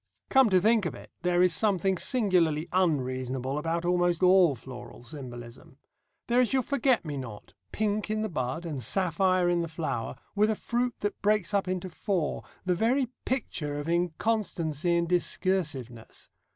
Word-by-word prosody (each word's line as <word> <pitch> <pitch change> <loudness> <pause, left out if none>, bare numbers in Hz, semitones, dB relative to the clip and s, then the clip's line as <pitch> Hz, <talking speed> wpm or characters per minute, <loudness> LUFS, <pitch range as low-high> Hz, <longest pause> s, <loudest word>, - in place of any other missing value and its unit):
Come 265 -4 +6
to 185 -2 +5
think 215 0 +3
of 140 - -6
it, - - -13
there 180 0 +3
is 180 -2 +4
something 190 +1 +2
singularly 180 - +1
unreasonable 130 -5 0
about 165 +2 -2
almost 175 0 +1
all 180 -5 +6
floral 125 0 -11
symbolism. 120 -1 -10 0.5
There 240 +1 +2
is 250 -1 +2
your 260 -1 +2
forget 265 -6 +1
me 145 -2 -4
not, 110 -8 -8 0.2
pink 210 -1 -1
in 215 0 -1
the - - 0
bud, 145 -1 -3
and 150 -6 -4
sapphire 185 +2 +2
in 175 -1 +2
the 170 - -2
flower, 155 -9 -3 0.2
with 210 +1 +3
a 220 - +1
fruit 240 +2 -1
that 205 0 -3
breaks 210 -2 +1
up 200 -2 +1
into 185 0 -2
four, 180 -1 -2 0.2
the 180 - +2
very 240 +7 +1 0.2
picture 160 - -2
of 145 - -5
inconstancy 170 -2 0
and 170 0 0
discursiveness. 160 - -2
175 Hz, 165 wpm, -28 LUFS, 150-205 Hz, 0.5 s, Come